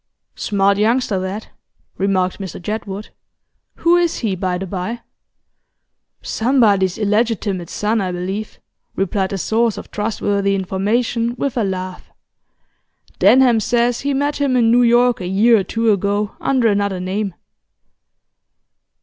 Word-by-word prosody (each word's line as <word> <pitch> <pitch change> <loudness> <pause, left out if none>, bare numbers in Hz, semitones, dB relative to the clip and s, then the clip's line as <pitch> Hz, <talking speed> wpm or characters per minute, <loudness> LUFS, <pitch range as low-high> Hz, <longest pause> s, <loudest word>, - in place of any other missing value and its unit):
'Smart 200 -1 +1
youngster, 225 -2 +1
that,' 190 +3 -5 0.5
remarked 190 -1 0
Mr 190 -2 -6
Jedwood. 205 +1 -5 0.7
'Who 340 +1 +3
is 345 -1 +1
he, 210 -5 -1
by 180 0 -2
the 190 - -4
bye?' 195 +6 -4 1.2
'Somebody's 215 -7 +2
illegitimate 210 -4 0
son, 215 +1 0
I 185 -1 -2
believe,' 190 +4 -5 0.4
replied 195 0 -1
the 195 - -3
source 225 +3 0
of - - -9
trustworthy 205 -2 0
information, 230 +5 -1
with 275 0 -2
a 235 - +1
laugh. 185 -1 -5 1.1
'Denham 235 +4 +5
says 240 +2 +1
he 280 0 -1
met 285 +2 0
him 280 -3 +1
in 230 -2 +4
New 245 +1 +5
York 240 -1 +3
a 180 - -4
year 220 +5 +4
or - - -1
two 225 +3 +1
ago, 205 +1 -1
under 260 -4 +1
another 200 -3 0
name. 190 +1 -3
210 Hz, 130 wpm, -19 LUFS, 190-235 Hz, 1.2 s, Denham